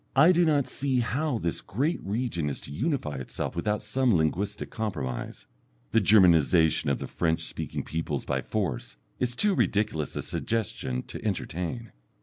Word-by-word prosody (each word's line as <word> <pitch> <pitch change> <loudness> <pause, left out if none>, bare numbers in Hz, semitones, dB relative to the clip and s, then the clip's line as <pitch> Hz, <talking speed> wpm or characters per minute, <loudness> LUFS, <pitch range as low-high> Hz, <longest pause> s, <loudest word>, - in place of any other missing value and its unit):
I 155 +6 +7
do 175 -1 +4
not 145 -4 +3
see 130 -2 0
how 135 +3 0
this 85 -6 -2
great 145 - -1
region 100 -7 -1
is 70 - -4
to - - -9
unify 115 - -1
itself 65 - -4
without 105 +5 -1
some 120 +1 +2
linguistic 95 +6 -1
compromise 80 - -4 0.5
the 115 - +4
Germanization 85 -6 +5
of 70 - +1
the - - -5
French 80 -1 0
speaking - - -4
peoples 80 0 -3
by - - -1
force 80 - -3 0.2
is 125 -1 0
too 210 +6 +3
ridiculous 105 - 0
a - - -2
suggestion 105 - -2
to - - -8
entertain. 90 +8 -3
105 Hz, 155 wpm, -28 LUFS, 80-125 Hz, 0.5 s, I